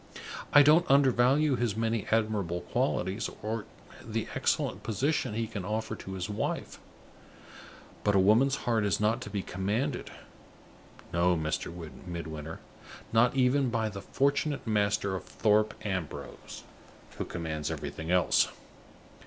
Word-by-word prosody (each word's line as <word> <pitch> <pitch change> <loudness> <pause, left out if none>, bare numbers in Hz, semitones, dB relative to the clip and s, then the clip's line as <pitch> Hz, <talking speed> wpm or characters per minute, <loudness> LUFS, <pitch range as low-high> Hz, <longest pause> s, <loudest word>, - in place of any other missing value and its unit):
I 145 - +9
don't 155 +4 +5
undervalue 135 +1 +4
his 120 -4 0
many 115 -2 0
admirable 105 -6 0
qualities, 95 +6 -1
or 110 0 -2 0.4
the - - -3
excellent - - 0
position 130 0 0
he 115 0 0
can 110 -4 -6
offer 110 +3 -2
to 95 - -8
his 95 -1 -3
wife. 105 0 -3 1.2
But 105 - +2
a - - +6
woman's 115 +8 +5
heart 115 -3 +2
is 100 -2 +1
not 105 +2 +1
to - - -6
be 100 -2 -3
commanded 110 +9 -2 1.0
no, 85 +1 +3
Mr. 80 +1 -2 0.4
Midwinter, 80 -2 -6 0.5
not 120 +3 +4
even 130 +1 +3
by 115 -2 0
the 100 -1 -7
fortunate 140 +3 0
master 105 -3 +1
of 95 - -5
Thorpe 105 0 +2
Ambrose, 95 -6 -5 0.6
who - - 0
commands 80 -3 -4
everything 80 +1 -5
else." 90 -1 +4
110 Hz, 130 wpm, -29 LUFS, 95-120 Hz, 1.2 s, I